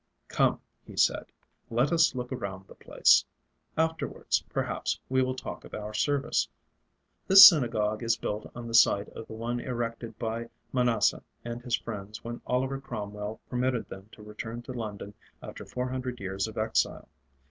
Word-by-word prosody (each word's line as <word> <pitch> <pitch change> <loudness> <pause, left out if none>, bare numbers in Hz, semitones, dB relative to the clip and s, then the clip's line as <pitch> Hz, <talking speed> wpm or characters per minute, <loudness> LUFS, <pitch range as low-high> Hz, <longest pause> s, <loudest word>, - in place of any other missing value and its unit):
"Come," - - +2 0.2
he - - -13
said, - - +2 0.4
"let 120 +6 +1
us 165 -5 +4
look 125 0 -4
around 95 -6 -5
the - - -14
place. - - +4 0.5
Afterwards, 160 0 0
perhaps, - - -2
we 130 0 +3
will 130 0 0
talk 130 - -7
of - - -9
our 105 0 -6
Service. 140 +6 +1 0.8
This 195 +1 +12
synagogue 115 - +2
is 115 0 +1
built 105 -1 -4
on 120 -1 -7
the 115 - -6
site 110 -3 +5
of 115 - -10
the - - -9
one 115 +2 -3
erected 115 -2 -4
by 115 0 -3 0.2
Manasseh 120 -5 +2 0.2
and 120 0 -5
his 125 0 0
friends 105 -1 -7
when 120 0 -6
Oliver 130 +2 -1
Cromwell 105 -3 -6
permitted 125 -1 -1
them 95 +2 -10
to 105 - -13
return 110 +3 -7
to 130 - -7
London 105 -4 -6 0.3
after - - -9
four 125 0 -3
hundred 125 -1 -4
years 95 +1 -2
of 110 - -10
exile. 110 +1 0
115 Hz, 165 wpm, -28 LUFS, 110-125 Hz, 0.8 s, This